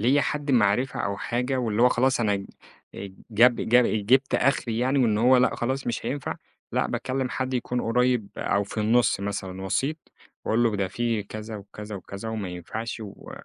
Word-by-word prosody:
ليَّ 130 +6 +4
حد 145 -1 -2
معرفة 120 +1 +2
أو 100 0 -2
حاجة 125 +4 -1
واللي 115 -1 0
هو 125 - +7
خلاص 130 0 +2
أنا 100 -3 0 0.8
جاب 120 +3 +6
جاب 125 +1 +4 0.2
جبت 135 +3 +3
أخري 120 -4 +1
يعني 130 +3 +2
وإن 110 -4 +3
هو 125 +3 +5
لأ 125 0 +3
خلاص 130 +3 -2
مش 120 - -2
هينفع، 140 -1 -3 0.4
لأ، - - +1
باكلم 130 0 -2
حد 130 0 -2
يكون 125 0 -1
قريب 125 -2 +1
أو 100 0 0
في 105 +2 -5
النُص 110 -1 +3
مثلًا، 95 -2 -4
وسيط 135 - 0 0.5
وأقول 115 +2 +2
له 115 -3 +2
ده 95 -1 -1
في 115 0 -1
كذا 110 +2 -7
وكذا 105 +1 -9
وكذا 100 +4 -7
وما 110 -4 -3
ينفعش 110 +7 -6
و 105 -3 -10
115 Hz, 180 wpm, -25 LUFS, 105-125 Hz, 0.8 s, هو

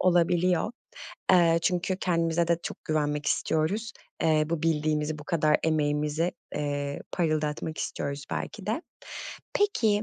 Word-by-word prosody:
olabiliyor. 175 +2 +3 0.6
Eee, 170 -2 +6
çünkü 180 +1 +1
kendimize 170 -1 +1
de 170 0 +3
çok - - -6
güvenmek 150 -1 0
istiyoruz. 200 +12 0 0.3
Eee, 155 -1 +4
bu 165 -2 -1
bildiğimizi, 155 -1 +1
bu 150 - -9
kadar 155 -2 +3
emeğimizi, 150 +1 +1 0.2
eee, 145 -1 -2
parıldatmak 155 -2 -1
istiyoruz 140 0 -3
belki - - -4
de. - - -1 0.7
Peki, 220 - +2
160 Hz, 120 wpm, -28 LUFS, 150-175 Hz, 0.7 s, Eee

